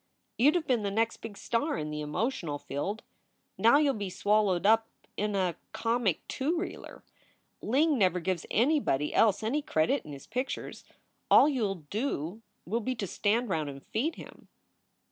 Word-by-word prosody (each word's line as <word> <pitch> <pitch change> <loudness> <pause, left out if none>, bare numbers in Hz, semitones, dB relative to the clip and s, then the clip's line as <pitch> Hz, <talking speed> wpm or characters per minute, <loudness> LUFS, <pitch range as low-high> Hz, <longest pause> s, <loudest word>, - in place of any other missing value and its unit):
You 265 +5 +7
d 315 - +2
have 330 - -3
been 250 -5 +1
the 200 - -1
next 225 +3 0
big 215 -3 -9
star 235 +7 -1
in 150 -1 -4
the 150 0 -4
emotional 150 - -2
field. 190 +11 -4 0.5
Now 230 +5 +5
you 295 -1 +3
ll - - -5
be 200 -3 -4
swallowed 200 -1 +1
up 225 +1 +5 0.3
in 210 0 -1
a 180 -4 0 0.2
comic 230 -6 0
two 305 +6 -1
reeler. 360 - -6 0.6
Ling 285 +4 +2
never 185 -2 +3
gives 180 -1 -2
anybody 230 - +1
else 220 -1 +3
any 265 +8 0
credit 265 - +1
in 150 - -10
his 140 -1 -9
pictures. 255 +4 -4 0.5
All - - +8
you 255 -8 +1
ll 195 - -2 0.2
do 210 - -2 0.2
will 220 +7 -1
be 255 +4 -2
to 215 - -3
stand 220 +5 0
round 155 -5 -1
and 140 -1 -10
feed 285 +10 -1
him." - - -12
215 Hz, 180 wpm, -29 LUFS, 180-255 Hz, 0.6 s, All